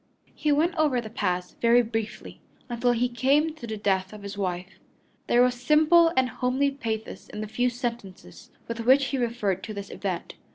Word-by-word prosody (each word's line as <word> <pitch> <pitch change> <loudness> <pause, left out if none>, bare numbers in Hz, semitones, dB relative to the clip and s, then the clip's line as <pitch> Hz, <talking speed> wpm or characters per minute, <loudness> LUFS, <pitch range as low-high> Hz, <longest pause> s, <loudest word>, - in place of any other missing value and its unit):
He 300 - 0
went 315 +5 +2
over 295 -5 +2
the 220 -2 -7
past 180 -4 -3
very 240 +1 +5
briefly 225 -1 -5 0.3
until 240 +1 +1
he 240 +1 +1
came 275 +6 +2
to 275 -7 -9
the 220 -1 -4
death 190 -1 0
of 210 -1 -10
his 200 0 -6
wife. 185 -1 -4 0.5
There 240 +1 +5
was 250 0 +3
simple 315 +4 +5
and 260 -1 +4
homely 260 +3 0
pathos 225 -6 -5
in 210 - -6
the 215 - -4
few 245 +4 +1
sentences 235 -6 -6 0.2
with 230 0 -5
which 260 +4 +4
he 270 0 -2
referred 225 -6 -1
to 215 - -7
this 200 0 -7
event. 185 -4 -4
240 Hz, 190 wpm, -26 LUFS, 205-265 Hz, 0.5 s, very